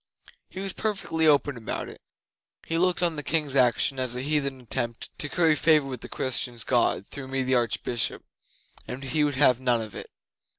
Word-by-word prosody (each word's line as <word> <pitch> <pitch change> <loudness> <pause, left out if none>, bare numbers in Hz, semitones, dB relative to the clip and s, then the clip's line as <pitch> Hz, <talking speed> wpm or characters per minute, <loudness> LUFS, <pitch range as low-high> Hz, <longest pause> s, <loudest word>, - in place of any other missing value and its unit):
He 185 - -8
was 195 -1 -2
perfectly 185 -7 0
open 145 -2 +3
about 110 - -4
it. - - -11 0.6
He 165 0 -1
looked 180 0 +2
on 170 -3 +2
the - - -1
King's 150 -2 0
action 130 +1 +3
as 125 -1 0
a 125 - -4
heathen 140 -2 -1
attempt 120 -1 -4
to 145 - 0
curry 165 -2 +3
favour 155 -2 +4
with 130 -3 -6
the - - -8
Christians' 125 -2 -1
God 120 -5 +1
through 140 -2 -7
me 135 0 -1
the 130 +1 0
Archbishop, 120 -1 0 0.6
and 130 +2 -6
he 140 +3 0
would 145 -2 0
have 130 -3 +4
none 125 -2 +2
of 110 -2 -6
it. - - -7
135 Hz, 195 wpm, -26 LUFS, 125-155 Hz, 0.6 s, favour